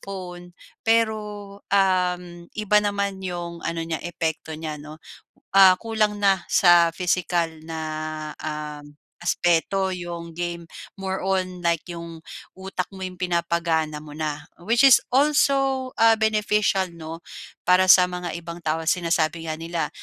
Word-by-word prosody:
phone. 180 -2 -8 0.2
Pero, 225 -1 +2 0.5
uhm, 180 -3 0
iba 210 -1 +2
naman 200 -1 -2
yung 175 -2 -5
ano 165 0 -3
niya 165 -1 -3
epekto 160 -2 -4
niya, 155 -2 -6
'no? 150 +1 -10 0.5
Ah, 190 -1 +8
kulang 215 +1 0
na 195 -1 +3
sa 170 -2 +5
physical 175 -2 0 0.2
na, 160 -1 -5 0.6
um, 150 -1 -6 0.2
aspeto 175 +3 +1
yung 170 -1 -7
game. 170 -1 -4 0.3
More 190 0 -3
on 185 -2 -1
like 170 0 0
yung 170 -1 -8 0.3
utak 190 -1 -4
mo 190 - -10
yung 185 -1 -5
pinapagana 170 -3 0
mo 150 0 -9
na. 150 -1 -4 0.2
Which 230 +7 +2
is 270 - +8
also, 270 -1 +2
ah, 225 0 +6
beneficial, 210 -4 +1
'no. 165 0 -9 0.4
Para 185 +1 +4
sa 180 0 +8
mga 180 -2 -4
ibang 170 0 -8
tao, 160 0 -2
sinasabi 165 -2 0
nga 155 - -2
nila 165 -1 -3
175 Hz, 135 wpm, -24 LUFS, 165-195 Hz, 0.6 s, Ah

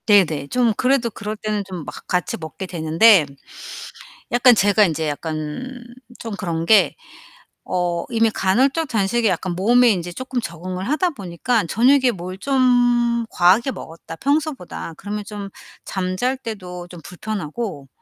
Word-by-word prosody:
네 205 -3 +7
네. 145 -3 -5
좀 240 +4 +2
그래도 255 -2 +2
그럴 210 +1 -5
때는 210 -1 -2
좀 185 -2 -7
막 - - -10
같이 180 -3 -1
먹게 160 +4 -7
되는데 165 +2 +4 1.1
약간 245 0 +6
제가 205 0 +4
인제 160 -3 -1
약간 155 - -5 0.4
좀 225 - -6
그런 170 -4 -3
게 220 +2 +5 0.7
어 175 -2 -1
이미 225 -1 +2
간헐적 265 +12 +1
단식이 225 0 +1
약간 185 -1 -1
몸에 240 +6 +4
인제 175 -3 -3
쪼끔 255 +3 -4
적응을 185 +2 -5
하다 345 +5 +1
보니까 205 - -1
'저녁에 255 - +4
뭘 185 -2 -7
좀 245 -2 +2
과하게 190 +9 +4
먹었다 165 -6 -9
평소보다.' 280 - -2
그러면 210 +1 -5
좀 205 -1 -7 0.4
잠 185 -1 -3
잘 255 +6 0
때도 185 -8 -7
좀 175 -1 -11
불편하고 180 -4 -5
205 Hz, 280 characters per minute, -21 LUFS, 175-240 Hz, 1.1 s, 네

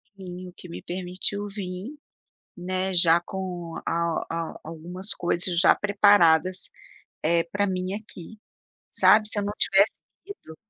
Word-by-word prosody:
Sim, 185 -1 -9
o - - -16
que 180 - -13
me - - -8
permitiu 185 +3 -2
vir, 200 +7 -7 0.6
né, 185 +1 -2
já 170 -1 +6
com 180 -3 -6
a 170 - -1 0.3
a 165 -1 -5
algumas 175 +5 -5
coisas 175 0 0
já - - +6
preparadas, 190 -4 +3 0.5
eh, 170 +1 +2
para 200 +4 -1
mim 185 0 -3
aqui, 215 -1 -10 0.5
sabe. 215 0 +4
Se 215 - -2
eu 205 - -1
não 205 - -2
tivesse 195 +2 +4 0.3
ido 395 - -11
185 Hz, 140 wpm, -25 LUFS, 175-200 Hz, 0.6 s, já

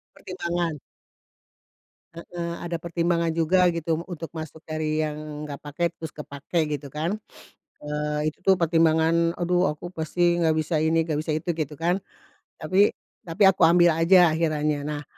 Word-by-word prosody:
Pertimbangan. 170 -3 -3 1.3
Heeh, 170 0 -6
ada 170 -1 -3
pertimbangan 170 0 0
juga 170 +3 +3
gitu 165 -1 -1
untuk 170 -3 -7
masuk 160 0 -8
dari 155 0 -1
yang 150 -1 -5
gak 140 - -5
pakai, 170 +4 -1
terus 160 -1 -7
kepakai 150 +2 -3
gitu 145 -1 -4
kan, 165 +7 -2 0.6
eee, 150 +1 -2
itu 155 - -16
tuh 195 - +6
pertimbangan, 165 0 +3
"Aduh 180 +1 +2
aku 165 +4 -9
pasti 175 +1 0
nggak 160 -2 +2
bisa 155 +1 0
ini, 160 +1 +2
nggak 160 -2 -2
bisa 155 0 -2
itu," 155 +3 -3
gitu 155 -2 -3
kan. 170 +5 0 0.6
Tapi 185 +6 +2 0.3
tapi 165 +5 0
aku 195 -1 +5
ambil 175 0 +5
aja 175 0 +6
akhirannya. 150 -2 0
Nah 150 -1 -4
165 Hz, 150 wpm, -25 LUFS, 155-170 Hz, 1.3 s, tuh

